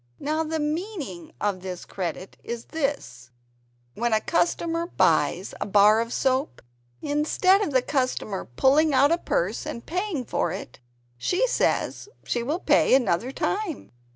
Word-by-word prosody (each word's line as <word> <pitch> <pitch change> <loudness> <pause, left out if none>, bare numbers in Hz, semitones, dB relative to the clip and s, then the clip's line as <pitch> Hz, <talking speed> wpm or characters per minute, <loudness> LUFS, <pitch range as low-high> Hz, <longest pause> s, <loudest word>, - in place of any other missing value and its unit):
Now 310 +2 -1
the 320 0 -2
meaning 300 - -4
of 200 -3 -1 0.3
"credit" 185 0 -5
is 235 0 -5
this 275 - -3 0.6
when 235 - -1
a 215 - +4
customer 335 +4 0
buys - - +1
a - - -1
bar 210 +2 +5
of 230 0 -4
soap, 265 +3 0 0.4
instead 315 +7 +3
of 410 - 0
the 260 -3 +2
customer 255 -8 -1
pulling 275 - +3
out 280 +3 +5
a 340 - +2
purse 190 - -1
and 235 - -6
paying 360 -6 -2
for 175 - -1
it 180 -9 -7 0.4
she 365 - +1
says 480 -3 0
she 240 - -1
will 290 +8 -1
pay 360 - +4
another 240 -1 +1
time. 385 +2 -3
270 Hz, 145 wpm, -25 LUFS, 215-320 Hz, 0.6 s, bar